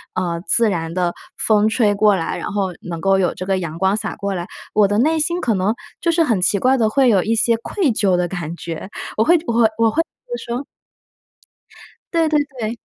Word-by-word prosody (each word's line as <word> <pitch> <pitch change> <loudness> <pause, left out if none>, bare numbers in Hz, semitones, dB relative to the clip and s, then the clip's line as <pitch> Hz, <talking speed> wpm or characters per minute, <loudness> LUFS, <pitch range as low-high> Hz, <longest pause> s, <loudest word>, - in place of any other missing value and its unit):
呃， 170 -2 -2
自 230 -2 +3
然 165 -2 -3
的 175 -2 0 0.2
风 215 -1 +3
吹 220 -2 +2
过 205 0 +4
来， 165 -3 -2
然 - - -4
后 195 -3 -1
能 170 -2 -6
够 195 +1 +3
有 180 -2 +1
这 185 - -5
个 190 0 0
阳 165 -3 -5
光 190 +3 +2
洒 215 0 -4
过 200 -2 -3
来， 175 -1 -4 0.3
我 205 -1 +4
的 205 - 0
内 315 +7 +2
心 340 +3 0
可 235 - +1
能 200 +3 0 0.3
就 335 - +2
是 330 0 +3
很 225 -10 +1
奇 200 +2 +2
怪 255 +6 +3
地 225 -3 +2
会 270 +3 +3
有 200 -5 +4
一 225 +5 0
些 230 +1 +3
愧 305 - -1
疚 200 -4 +2
的 175 0 0
感 170 -2 -5
觉。 170 +2 -7 0.3
我 220 - +4
会 345 +5 +5
我 235 - -1
我 230 - +1
会 220 - +5 0.2
我 225 - +3
会 320 - +2 0.4
说 240 +4 -4 1.5
对 330 -1 +3
对 305 -1 +3 0.2
对。 225 +1 -3
205 Hz, 240 characters per minute, -19 LUFS, 185-235 Hz, 1.5 s, 会